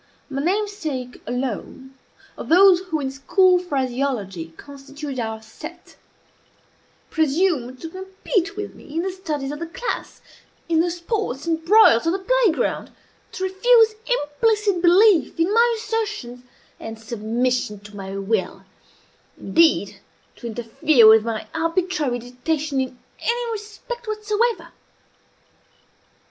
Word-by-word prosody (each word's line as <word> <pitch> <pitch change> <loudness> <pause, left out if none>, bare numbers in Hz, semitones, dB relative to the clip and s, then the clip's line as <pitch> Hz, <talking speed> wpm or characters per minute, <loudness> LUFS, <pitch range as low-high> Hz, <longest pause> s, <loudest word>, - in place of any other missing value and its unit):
My 275 0 -2
namesake 335 -9 -2
alone, 255 +1 -4 0.4
of - - -8
those 365 +2 +7
who 315 -4 -1
in 270 -2 -3
school 360 +7 +3
phraseology 255 - -2
constituted 280 -1 -8
"our 220 -1 -4
set," 315 +10 -11 1.2
presumed 305 -5 +1
to 325 - -6
compete 380 +2 -3
with 410 0 -5
me 300 - -13
in 335 - 0
the 380 - -2
studies 305 -7 -4
of 295 - -6
the 335 - -4
class 485 +9 -5 0.5
in 330 -1 +2
the 345 +2 +2
sports 340 - -3
and 325 -1 -1
broils 340 - +6
of 330 - +2
the - - 0
play 460 +2 +2
ground - - -2 0.4
to 375 - -5
refuse 440 +4 +4
implicit 415 0 +1
belief 360 -1 +4
in 345 +5 +2
my 470 +1 +4
assertions, 425 - -4 0.4
and 225 0 -7
submission 225 0 -2
to 205 0 -13
my 195 0 -6
will 195 0 -2 0.7
indeed, 330 -1 +2 0.4
to 240 - -7
interfere 230 +2 +3
with 220 0 +7
my 225 -1 -3
arbitrary 330 -5 0
dictation 270 +4 -2
in 255 -1 -5 0.2
any 475 0 -1
respect 440 +3 -7
whatsoever. 430 +2 -1
320 Hz, 125 wpm, -22 LUFS, 250-390 Hz, 1.2 s, those